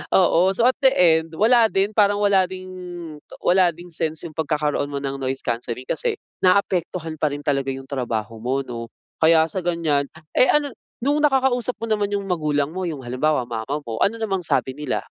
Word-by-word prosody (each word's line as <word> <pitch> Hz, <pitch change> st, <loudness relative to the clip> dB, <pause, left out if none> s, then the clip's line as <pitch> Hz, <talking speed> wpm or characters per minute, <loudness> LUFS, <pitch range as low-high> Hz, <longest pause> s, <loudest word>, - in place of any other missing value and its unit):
Oo. 185 Hz, 0 st, +4 dB
So, 230 Hz, -, +1 dB
at 255 Hz, -, +3 dB
the 265 Hz, -, +7 dB
end, 165 Hz, -5 st, +3 dB
wala 230 Hz, +4 st, +5 dB
din. 195 Hz, +2 st, +1 dB
Parang 205 Hz, -1 st, +3 dB
wala 200 Hz, -2 st, +4 dB
ding 185 Hz, 0 st, -8 dB, 0.8 s
wala 180 Hz, -1 st, +4 dB
ding 175 Hz, +1 st, -12 dB
sense 160 Hz, -1 st, -3 dB
'yong 155 Hz, -, -14 dB
pagkakaroon 150 Hz, -2 st, -1 dB
mo 140 Hz, -, -3 dB
ng 140 Hz, -1 st, -3 dB
noise 135 Hz, 0 st, -2 dB
cancelling 120 Hz, +1 st, -3 dB
kasi 475 Hz, -3 st, -1 dB, 0.3 s
naapektuhan 180 Hz, -3 st, +1 dB
pa 150 Hz, -2 st, +1 dB
rin 145 Hz, -, -4 dB
talaga 135 Hz, -2 st, 0 dB
'yong 135 Hz, 0 st, -8 dB
trabaho 115 Hz, -5 st, -3 dB
mo 125 Hz, +4 st, -1 dB
'no. 115 Hz, -2 st, -6 dB, 0.3 s
Kaya 160 Hz, 0 st, +5 dB
sa 190 Hz, -, -2 dB
ganyan, 165 Hz, -5 st, +1 dB, 0.3 s
eh, 255 Hz, -, +5 dB
ano 290 Hz, -1 st, +1 dB, 0.3 s
nung 290 Hz, +3 st, +2 dB
nakakausap 260 Hz, -3 st, +2 dB
mo -, -, -1 dB
naman 205 Hz, -2 st, 0 dB
'yong 200 Hz, -1 st, -2 dB
magulang 150 Hz, -5 st, 0 dB
mo, 185 Hz, +2 st, -4 dB
yung 150 Hz, -5 st, -5 dB
halimbawa, 130 Hz, +4 st, 0 dB
mama 120 Hz, +5 st, -3 dB
mo, 115 Hz, -1 st, -5 dB
ano 215 Hz, -, +2 dB
namang 195 Hz, -4 st, -1 dB
sabi 135 Hz, -5 st, 0 dB
nila? 150 Hz, -3 st, -3 dB
160 Hz, 190 wpm, -22 LUFS, 140-200 Hz, 0.8 s, the